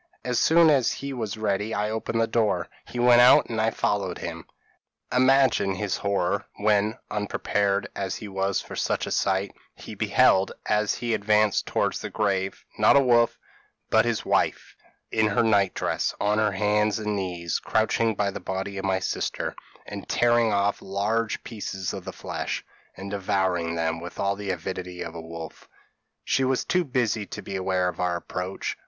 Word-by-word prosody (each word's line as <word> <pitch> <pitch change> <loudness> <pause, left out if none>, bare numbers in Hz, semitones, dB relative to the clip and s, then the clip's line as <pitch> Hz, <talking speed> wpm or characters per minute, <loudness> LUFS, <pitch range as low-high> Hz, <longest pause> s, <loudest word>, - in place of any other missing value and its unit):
As 125 -1 +1
soon 165 -1 +5
as 135 -5 +3
he 140 0 -5
was 110 -5 -4
ready 105 0 -1
I 105 +1 -1
opened 110 +1 -2
the 115 - +3
door; 110 -6 0 0.2
he - - -8
went 120 0 +6
out, 125 -1 +6
and 110 -1 0
I 110 - +3
followed 100 -5 -1
him. 85 -1 -7 0.7
"Imagine 130 -6 +4
his 100 0 -2
horror, 100 -1 -1
when 105 +1 +1
(unprepared 100 -1 0
as 95 -2 -3
he 110 - -7
was 95 0 -1
for - - -9
such - - -1
a - - -6
sight) 95 +1 0 0.2
he - - -10
beheld, 95 +1 +3
as 105 0 +1
he 120 -1 -2
advanced 105 -1 +2
towards - - 0
the - - -5
grave 95 -2 -1
not - - +6
a - - +8
wolf, 120 -3 +3 0.5
but - - +5
his - - -1
wife, - - 0 0.4
in 110 -1 +2
her 105 +2 +2
night 100 -4 +2
dress, - - -1
on 105 +1 +1
her 105 -2 +2
hands 105 +1 +1
and 105 -1 -2
knees, 90 -4 -2
crouching 110 0 +1
by 100 -1 0
the - - -6
body 95 +1 -4
of 95 - -4
my 95 -1 +2
sister, 95 - -3 0.3
and - - -8
tearing 120 -1 +3
off 100 0 +1
large 105 +4 -1
pieces 100 -4 -5
of - - -7
the - - -5
flesh, - - -4 0.3
and 100 +1 -7
devouring 95 -4 0
them 80 0 -1
with 85 0 -9
all 100 0 +1
the 100 0 -6
avidity 90 0 -4
of 85 - -7
a 85 - -7
wolf. 80 0 -9 0.5
She 135 - +1
was 130 0 +1
too 180 -1 +2
busy 120 -6 -1
to - - -7
be 100 - -6
aware 95 -1 0
of 90 -2 -4
our 90 -1 0
approach. 90 +2 -4
100 Hz, 180 wpm, -25 LUFS, 95-110 Hz, 0.7 s, a